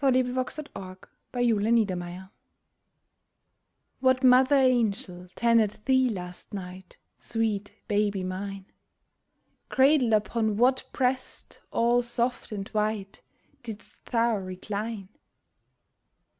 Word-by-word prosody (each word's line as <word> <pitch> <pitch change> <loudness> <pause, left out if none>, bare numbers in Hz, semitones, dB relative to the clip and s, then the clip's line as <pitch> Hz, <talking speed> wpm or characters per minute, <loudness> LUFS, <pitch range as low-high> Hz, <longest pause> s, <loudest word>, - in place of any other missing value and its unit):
A 270 - +5
MOTHER'S 255 +4 -3 0.7
QUESTION 205 -6 0 1.7
What 260 0 +3
mother 260 +2 +6
angel 225 -8 +1
tended 230 -3 +3
thee 260 -1 +4
last 180 -4 -7
night, 185 -1 -9 0.2
Sweet 215 -3 -2
baby 205 -2 0
mine? 190 +1 -5 1.0
Cradled 265 -3 +4
upon 215 0 +1
what 260 +3 +3
breast 255 0 -2
all 240 +1 +3
soft 240 0 -2
and 200 -2 -4
white 210 -2 -2 0.4
Didst 225 -3 -10
thou 230 -2 +2
recline 200 +2 -5
220 Hz, 90 wpm, -27 LUFS, 195-250 Hz, 1.7 s, mother